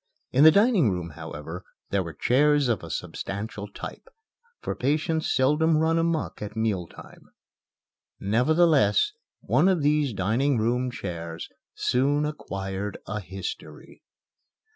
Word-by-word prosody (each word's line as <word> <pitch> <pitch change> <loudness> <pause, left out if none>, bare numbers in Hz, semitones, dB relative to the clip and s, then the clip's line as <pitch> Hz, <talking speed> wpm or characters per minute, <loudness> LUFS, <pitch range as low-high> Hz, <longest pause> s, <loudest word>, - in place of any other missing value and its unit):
In 135 +3 +4
the 160 - +11
dining 200 - +4
room, 90 -3 -3
however, 75 +5 -8 0.3
there 100 - +2
were 85 -4 -7
chairs 145 - +3
of 115 - 0
a 85 - -9
substantial 100 +6 -5
type, 100 - -9 0.5
for - - -3
patients 155 +4 0
seldom 150 +4 +3
run 160 +1 +2
amuck 165 -2 -1
at 105 0 -6
meal 105 -6 -1
time. - - -15 0.9
Nevertheless, 135 - +3 0.3
one 180 - +3
of 180 -6 +1
these 150 -2 +2
dining 115 +8 +1
room 120 +3 0
chairs 85 -7 -6 0.3
soon 145 +4 +1
acquired 100 -8 -4
a 105 +1 -4
history. 95 -2 -8
120 Hz, 125 wpm, -26 LUFS, 95-150 Hz, 0.9 s, the